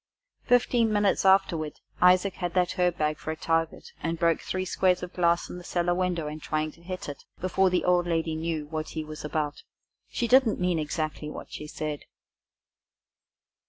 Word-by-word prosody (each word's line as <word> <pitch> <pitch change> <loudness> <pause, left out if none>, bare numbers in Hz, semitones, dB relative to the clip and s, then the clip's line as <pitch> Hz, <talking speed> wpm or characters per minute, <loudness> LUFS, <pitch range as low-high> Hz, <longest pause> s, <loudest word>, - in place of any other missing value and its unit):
Fifteen 240 -2 +3
minutes 205 -2 +2
afterward 190 -5 +3 0.3
Isaac 185 +2 +5
had 175 -1 -3
that 180 -1 +3
herb 180 -1 +2
bag 150 0 0
for - - -7
a 160 - -1
target, 165 0 -1
and 165 +1 -2
broke 165 -1 +2
three 185 0 -3
squares 180 -1 +2
of 180 - -6
glass 170 -1 +2
in 180 - -7
the - - -11
cellar 175 0 0
window 180 -3 -1
in 150 +1 -5
trying 155 0 -2
to 165 - -20
hit 185 +1 -6
it, 145 - -7 0.2
before 185 +1 +2
the 180 0 0
old 180 -1 +3
lady 165 -1 0
knew 160 -1 -2
what 155 +1 -4
he 155 - -1
was 155 0 -8
about. 150 -1 -2 0.5
She 235 - -1
didn't 255 -3 +4
mean 180 -2 +1
exactly 155 0 -3
what - - -9
she 150 - -7
said. 150 -1 -5
170 Hz, 185 wpm, -27 LUFS, 155-185 Hz, 0.5 s, Isaac